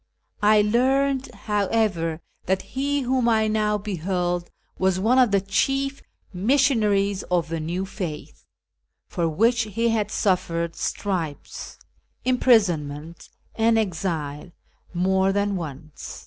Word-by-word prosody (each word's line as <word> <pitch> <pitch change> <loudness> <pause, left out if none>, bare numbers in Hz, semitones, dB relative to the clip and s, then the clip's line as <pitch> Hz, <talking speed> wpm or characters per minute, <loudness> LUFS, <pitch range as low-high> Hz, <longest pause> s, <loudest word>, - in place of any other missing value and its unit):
I 210 0 +5
learned, 265 +4 +1
however, 200 -6 0 0.3
that 190 +1 +1
he 280 +2 0
whom 255 -1 +1
I 220 -1 +3
now 215 -1 +1
beheld 180 -3 -2 0.3
was 185 -1 +2
one 235 +6 +3
of 250 -3 +5
the 200 -1 +2
chief 270 +8 0 0.3
missionaries 205 -3 +2
of 175 -3 +1
the 165 0 -2
new 175 +4 -3
faith, 175 -6 -7 0.6
for 170 -2 -1
which 230 +9 +2
he 230 +2 0
had 215 -2 0
suffered 170 -5 0
stripes, 170 -8 -4 0.5
imprisonment, 170 - +1 0.2
and 225 0 +3
exile 165 -6 -2 0.4
more 190 +2 +2
than 200 0 0
once. 155 -3 -7
200 Hz, 115 wpm, -24 LUFS, 175-230 Hz, 0.6 s, I